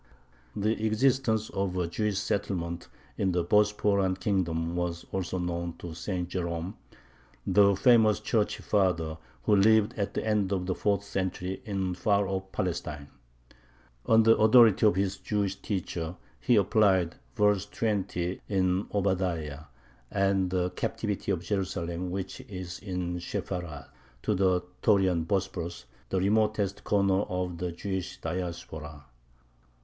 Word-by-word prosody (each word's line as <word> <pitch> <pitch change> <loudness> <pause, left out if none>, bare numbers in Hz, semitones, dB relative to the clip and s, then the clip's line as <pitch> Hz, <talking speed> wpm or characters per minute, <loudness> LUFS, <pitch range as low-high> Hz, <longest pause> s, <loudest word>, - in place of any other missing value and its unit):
The 110 +2 0
existence 110 -1 +2
of 95 -2 -2
a 90 - +1
Jewish 105 +3 -1
settlement 90 -4 -2 0.3
in 95 -2 +1
the 90 -1 +1
Bosporan 100 -1 +2
kingdom 85 -4 0
was 90 -1 -2
also 95 -1 -2
known 85 -1 -3
to 85 -2 -7
St. 90 +1 -3
Jerome, 85 +1 -3 0.7
the 100 +1 +5
famous 110 0 +5
Church 110 -3 0
father, 85 -6 0 0.2
who 105 - +4
lived 110 +2 +4
at 100 - -2
the - - -2
end 105 -3 +1
of 95 -2 0
the 95 - 0
fourth 100 +1 0
century 95 -1 -3
in 95 -4 -1
far 100 +2 +1
off 95 0 -4
Palestine. 80 -6 -3 1.0
On 110 0 +6
the 115 +1 +6
authority 110 -1 +6
of 105 - +3
his 95 0 0
Jewish 100 -2 -1
teacher 90 -4 -3 0.2
he 120 - +3
applied 100 -4 +3 0.2
verse 105 -2 +2
20 100 -5 -2
in 95 -1 +1
Obadiah, 90 -7 -1 0.4
"and 95 -2 +1
the 90 0 0
captivity 105 +2 -2
of 90 -3 -1
Jerusalem 90 -2 -2
which 95 +1 -5
is 90 -3 -6
in 90 -3 -3
Sepharad," 85 -3 -5 0.4
to 105 - +1
the 95 -2 +2 0.2
Taurian 95 -6 +3
Bosporus, 90 -7 -2 0.2
the 95 - +1
remotest 105 0 +1
corner 100 -1 +2
of 90 -2 -3
the 90 -1 -2
Jewish 95 +1 -4
Diaspora. 80 -4 -5
95 Hz, 135 wpm, -28 LUFS, 90-105 Hz, 1.0 s, On